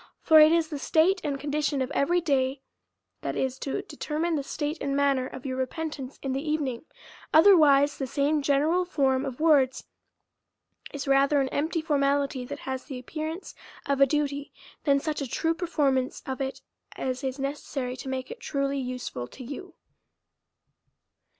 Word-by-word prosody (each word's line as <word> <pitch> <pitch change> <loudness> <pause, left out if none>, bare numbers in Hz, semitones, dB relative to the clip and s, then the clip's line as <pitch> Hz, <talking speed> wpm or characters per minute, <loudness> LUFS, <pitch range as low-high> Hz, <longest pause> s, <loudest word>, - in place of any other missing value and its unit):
For 315 -1 +6
it 305 +1 +8
is 330 -1 +2
the 295 -3 -4
state 360 +7 +3
and 280 -2 -2
condition 290 0 -1
of 260 +1 -2
<5very 345 +5 +1
day 270 -2 +1 0.6
that - - -3
is 265 0 -1
to 275 - -3
determine 320 +3 -2
the 300 - 0
state 295 +3 -3
and 275 0 -1
manner 275 -2 +2
of 260 0 -10
your 260 -1 -3
repentance 275 0 -4
in 270 -1 -1
the 270 - -1
evening; 300 -4 -2 0.5
otherwise, 305 -5 +6
the 270 - -2
same 290 +3 +1
ge 280 - -4
neral 310 +6 +3
form 265 -5 +1
of 260 0 -6
words 285 -5 +3 1.1
is 285 -1 -5
rather 275 +1 +4
an 270 -1 +1
empty 315 +4 -1
formality, 280 -3 +1
that - - -7
has 260 -1 -4
the 270 -4 -6
appearance 315 +7 -6 0.3
of 280 -1 0
a 275 - +8
duty, 285 0 -1 0.3
than 280 -2 +4
such 305 +1 -3
a 275 - -2
true 325 +7 0
perform 300 -6 +1
ance 255 0 -6
of 265 0 -4
it, 270 0 -3 0.3
as 255 +1 -3
is 265 0 -2
necessary 275 -2 -3
to 265 - -7
make 260 - -4
it 475 - -8
truly 275 -8 -1
useful 250 - -4
to 260 - -11
you. 290 +8 -8
280 Hz, 175 wpm, -27 LUFS, 265-310 Hz, 1.1 s, it